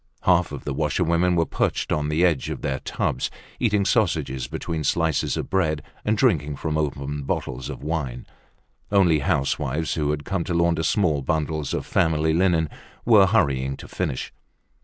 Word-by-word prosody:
Half 90 -3 +3
of 70 - -7
the 75 - -3
washerwomen 85 +4 +1
were 85 -1 +3
perched - - -1
on 75 0 0
the 80 +4 +3
edge 80 -7 +1
of - - -5
their 65 -2 -1
tubs, 65 - -2 0.3
eating 105 -4 +2
sausages 75 - 0
between 80 +2 -4
slices 80 -2 +1
of - - -4
bread 75 -6 +1 0.2
and 110 0 +1
drinking 75 - +2
from 75 +2 -3
open 75 -1 -2
bottles 65 -2 -3
of - - -7
wine. 70 -6 -3 0.7
Only 90 -6 +4
housewives 70 +1 0
who 75 -2 -1
had 75 -1 -2
come 95 -3 -1
to 85 - -2
launder 85 -1 +2
small 80 -4 +1
bundles 75 0 -1
of - - -3
family 80 -4 +2
linen 85 -2 +2 0.4
were 105 -5 +6
hurrying 70 -10 +1
to - - -10
finish. 65 - -3
80 Hz, 165 wpm, -24 LUFS, 70-90 Hz, 0.7 s, were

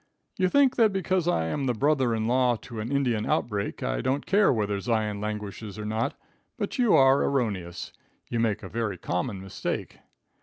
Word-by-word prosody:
You 185 -4 +2
think 270 +2 +4
that 225 -3 +5
because 185 -2 0
I 80 - +2
am 135 - -2
the 125 - +1
brother 135 -2 +2
in 110 0 -1
law 125 +1 +3
to 120 -4 -7
an 110 +4 -4
Indian 125 -6 +1
outbreak, 105 -3 -1
I - - -1
don't 135 +2 -1
care 205 +1 +4
whether 105 -4 0
Zion 105 -2 -1
languishes 105 0 -5
or 105 - -5
not; 110 +2 -1 0.4
but - - -3
you 240 -4 +5
are 135 +1 +6
erroneous. 95 -10 -2 0.3
You 120 - -2
make 110 -2 0
a - - -5
very 110 -5 -2
common 90 +5 -2
mistake. 95 0 -5
115 Hz, 185 wpm, -27 LUFS, 105-140 Hz, 0.4 s, are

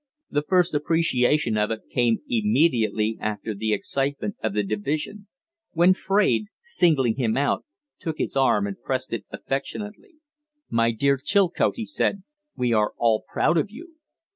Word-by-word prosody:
The 145 - +1
first 180 +2 +2
appreciation 145 -6 +2
of 105 - +1
it 110 -1 -3
came 120 -2 +2
immediately 155 - +1
after 105 +1 -3
the 110 +2 -2
excitement 135 +1 -2
of 100 - -2
the 105 - +2
division, 150 - -3 0.5
when 175 +3 +5
Fraide, 200 +2 +1
singling 160 - +2
him 115 -3 0
out, 140 +1 0 0.3
took 160 -2 -4
his - - -3
arm 130 -7 +3
and 100 -1 -6
pressed 130 -1 -2
it 115 - -3
affectionately. 210 - -5 0.6
"My 115 0 +3
dear 140 +4 +1
Chilcote," 195 -1 +2
he 230 - -4
said, 205 -6 -1 0.3
"we 125 -2 0
are 105 -1 +1
all 115 -2 +2
proud 165 +1 +2
of 175 - -1
you!" 325 - -13
140 Hz, 150 wpm, -24 LUFS, 115-185 Hz, 0.6 s, when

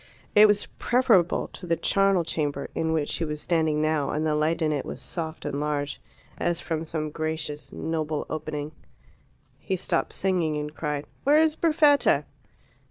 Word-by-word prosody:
It 210 +1 +8
was 205 0 +2
preferable 230 -9 +3
to 180 - -10
the 165 - +2
charnel 195 0 +2
chamber 145 -3 -2
in 160 0 -1
which 155 -2 0
she - - -1
was 150 -1 -3
standing 160 -2 +1
now, 155 -3 +1
and 155 +1 -1
the 155 - +1
light 155 +2 +1
in 155 - +2
it 145 -2 -1
was - - -7
soft 160 -2 -5
and 140 - -2
large, 145 -1 -2 0.4
as 175 0 0
from 165 -2 -3
some 155 -1 -3
gracious, 155 -1 -4
noble 155 -2 -2
opening. 150 -1 -4 0.9
He 190 - -2
stopped 180 - -1
singing, 175 -5 0
and 150 0 -4
cried 150 -2 -3 0.2
"Where 290 +2 +5
is 315 -1 +3
Perfetta?" 305 -3 +4
160 Hz, 165 wpm, -26 LUFS, 150-180 Hz, 0.9 s, It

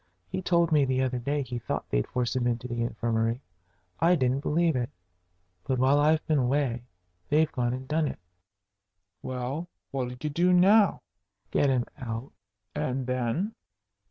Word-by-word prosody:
He 185 - -3
told 170 -2 +2
me 150 -2 +5
the 130 -1 +1
other 125 -1 -1
day 140 +3 -1
he 125 -1 -5
thought - - -3
they'd - - +1
force 125 0 -1
him 125 -1 +1
into 120 0 -1
the 120 -1 -3
infirmary. 115 0 0 0.6
I 175 +2 +5
didn't 130 -3 +1
believe 160 +2 +1
it. 120 -1 -1 0.7
But 130 - -1
while 135 +3 +4
I've 155 +2 +3
been 155 -2 +2
away 125 -2 0 0.4
they've 155 +1 +3
gone 120 -1 0
and 130 +1 -5
done 155 +1 +1
it." - - -5 1.0
"Well, 130 +7 -4 0.2
what'll 125 -2 -3
you 150 - -2
do 175 +4 +3
now?" 200 +3 +5 0.5
"Get 140 - +3
him 125 -2 +2
out." 115 +1 -5 0.4
"And 130 0 -2
then?" 130 - -1
130 Hz, 160 wpm, -28 LUFS, 125-155 Hz, 1.0 s, me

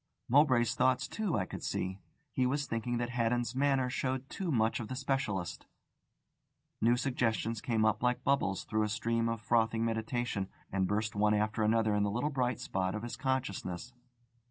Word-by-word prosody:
Mowbray's 125 -4 +4
thoughts, 130 0 +2
too, 210 - -1
I 95 - 0
could - - -7
see. 95 +1 -2 0.3
He 130 -1 +2
was 140 +2 0
thinking 120 0 -2
that 120 0 -2
Haddon's 120 0 0
manner 135 -1 +2
showed 130 +1 -2
too 185 -4 -2
much 115 -4 +2
of 115 - -4
the 130 - -4
specialist. 125 -9 -2 1.1
New 120 +2 +4
suggestions 115 -4 0
came 110 -3 +1
up 110 -2 +2
like 125 0 +1
bubbles 135 -9 +1
through 110 0 0
a 105 - +1
stream 115 +1 0
of 115 -1 -3
frothing 115 0 +2
meditation, 110 -2 -1 0.2
and 95 -1 +1
burst 105 +2 -1
one 105 +1 +3
after 105 +2 0
another 110 0 +3
in 105 - +2
the 100 - +2
little 120 +9 -1
bright 125 -3 0
spot 95 0 -1
of 105 - -4
his 120 - -4
consciousness. 125 -5 -2
115 Hz, 180 wpm, -32 LUFS, 110-130 Hz, 1.1 s, Mowbray's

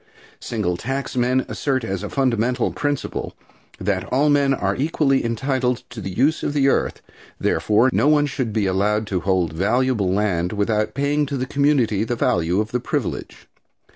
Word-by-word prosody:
Single 105 -7 -2
tax 135 +6 -4
men 125 +1 +1
assert 130 -3 -1
as 95 -4 -3
a 105 - -5
fundamental 125 -2 0
principle 145 -2 -3 0.4
that 95 -1 -1
all 145 +3 +2
men 140 -1 +3
are 100 -7 0
equally 140 -1 +1
entitled 125 +1 -1
to 120 -3 -7
the 95 - -4
use 135 - +1
of - - -2
the 140 -2 +3
earth; - - -1 0.4
therefore, 110 +5 +2
no - - +3
one 150 -1 +4
should 130 -5 -3
be 105 -1 0
allowed 105 +3 +1
to 95 -3 -1
hold 90 -2 0
valuable 105 +2 +1
land 95 -2 0
without 105 +2 0
paying 145 +1 +1
to 140 0 -3
the 130 - -2
community 135 -7 +2
the 120 +2 -2
value 85 -3 +1
of 110 0 -2
the 125 - 0
privilege. - - -4
120 Hz, 170 wpm, -21 LUFS, 100-135 Hz, 0.4 s, one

